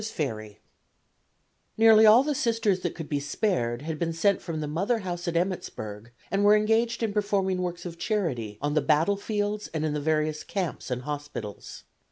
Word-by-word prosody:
] - - -7 1.7
Nearly 220 -1 +7
all 225 +5 +8
the 300 +1 0
Sisters 225 -7 +1
that 175 -2 -3
could 160 -3 -6
be 145 - -1
spared 140 - -1
had 155 -1 -4
been 165 -1 -1
sent 200 +4 +2
from 165 -3 -4
the 150 - -3
mother 195 +11 0
house 175 -1 -4
at 170 0 0
Emmittsburg, 115 - -4 0.2
and 200 +1 +1
were 205 +1 +7
engaged 225 +2 +1
in 215 -2 -1
performing 195 -3 0
works 175 -1 -4
of 170 -1 -7
charity 150 - -2
on 145 0 0
the 155 - +3
battlefields 205 +7 0
and 155 0 0
in 155 - -1
the 150 - -2
various 155 0 0
camps 185 -8 -4
and 125 0 -3
hospitals. 145 -8 -6
175 Hz, 180 wpm, -27 LUFS, 150-210 Hz, 1.7 s, all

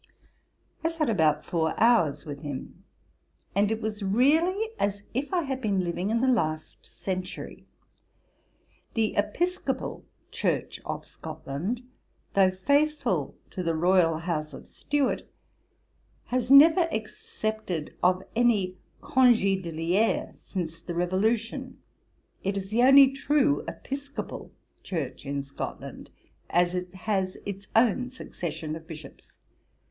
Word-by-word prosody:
I 325 - +2
sat 320 -6 0
about 155 -6 +2
four 160 -2 -1
hours 225 -13 +4
with 145 -2 -6
him, 145 -3 -7 0.7
and 205 +2 +2
it 220 0 -1
was 215 -1 -3
really 315 - +3
as 200 0 -1
if 270 +7 -2
I 355 -2 +1
had 265 -2 -3
been 200 -5 +1
living 175 +3 -2
in 230 +1 +1
the 260 - +2
last 155 -11 0
century. 185 -1 -6 1.3
The 220 -2 +1
Episcopal 325 - -1 0.3
Church - - -1
of - - -4
Scotland, 185 - -5 0.5
though 195 -1 +5
faithful 285 +11 +1 0.2
to 185 - -4
the 165 -2 0
royal 170 -1 +3
house 155 -3 -3
of - - -10
Stuart, 290 -2 -1 1.0
has 245 -1 -1
never 320 +5 +8
accepted 215 -5 -4
of 185 +1 +3
any 205 -6 +2 0.2
congé 240 -9 +4
d'liré, 170 +6 0
since 165 -3 -5
the 170 0 -6
Revolution; 225 +9 0 0.7
it 195 +1 -1
is 195 +1 -5
the 230 +3 +3
only 270 +1 +8
true 285 +1 +2
Episcopal 280 +1 -6 0.3
Church 150 -6 -4
in 140 0 -2
Scotland, 140 0 -7 0.4
as 175 +1 +3
it 180 0 -3
has 190 -1 -1
its 200 0 -6
own 245 +2 +3
succession 165 -10 -5
of 160 0 -10
bishops. 155 -4 -12
200 Hz, 120 wpm, -27 LUFS, 175-255 Hz, 1.3 s, never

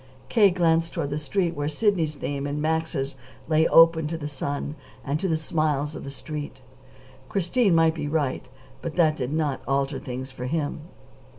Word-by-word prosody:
K. 210 -4 +6
glanced 165 -2 +2
toward 150 -5 -2
the 145 - -1
street 170 +3 -1
where 145 0 -2
Sidney's 160 -3 +1
name 140 0 -3
and 145 +1 -2
Max's 155 -3 -1 0.3
lay 160 0 +4
open 165 -1 +6
to 165 +2 -3
the 145 -2 -5
sun 145 0 -3 0.3
and 145 +2 -1
to 190 - -1
the 165 - +2
smiles 155 -2 0
of - - -7
the 140 - -6
Street. 145 -1 -6 0.7
Christine 195 +1 +2
might 165 -1 +4
be 150 -2 -4
right, 145 -4 -1 0.3
but 165 - -5
that 160 -3 +4
did 130 -2 -3
not 150 -3 -1
alter 135 0 0
things 130 +1 -6
for 125 -1 -6
him. 150 0 -2
155 Hz, 180 wpm, -25 LUFS, 140-165 Hz, 0.7 s, K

